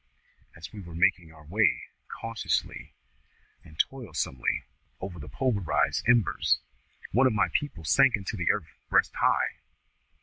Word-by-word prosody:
As 80 - -10
we 105 - -8
were 85 -4 -10
making 85 -2 +2
our 75 -1 -16
way, 105 +8 +2 0.2
cautiously 115 0 -3 0.7
and 75 - -16
toilsomely, 90 - -1 0.4
over 95 -2 -6
the 75 0 -8
pulverised 95 - 0
embers, 120 -7 +3 0.5
one 130 +3 +5
of 125 - +1
my 90 -4 +2
people 145 - -2
sank 135 - +5
into 105 +2 -5
the 90 -4 -1
earth - - -1
breast - - +3
high. - - +1
95 Hz, 135 wpm, -28 LUFS, 80-115 Hz, 0.7 s, one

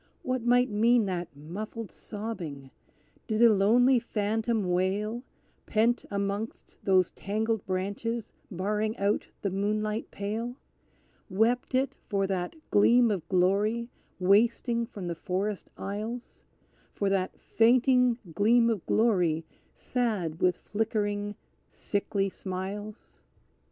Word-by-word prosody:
What 255 -1 -1
might 245 +1 +3
mean 230 +2 +4
that 180 -3 -2
muffled 205 +9 -6
sobbing? 175 -11 -6 0.6
Did 215 0 0
a 230 -2 +8
lonely 240 +6 +5
phantom 220 -1 -1
wail, 200 +6 0 0.5
Pent 230 +2 +2
amongst 200 +2 -4
those 185 -2 +3
tangled 220 +1 -2
branches 200 +5 -3 0.2
barring 210 +3 -1
out 200 +1 0 0.2
the 200 - 0
moonlight 210 +2 -1
pale? 220 +4 -4 0.7
Wept 230 +6 +1
it 265 +1 0
for 200 -3 +1
that 185 - -2 0.2
gleam 235 +3 +5
of 175 -5 -3
glory 205 +6 +2 0.3
wasting 230 +5 +3
from 200 -6 -7
the 175 - -2
forest 190 +4 -3
aisles; 215 +5 -6 0.5
For 200 - 0
that 190 -1 -1
fainting 250 +1 +4 0.2
gleam 230 +6 +4
of 210 -6 -2
glory 180 -8 +2 0.3
sad 210 -10 -2
with 180 -1 +3
flickering, 205 -1 -2 0.3
sickly 200 -1 -1
smiles? 195 - -6
210 Hz, 110 wpm, -28 LUFS, 195-230 Hz, 0.7 s, a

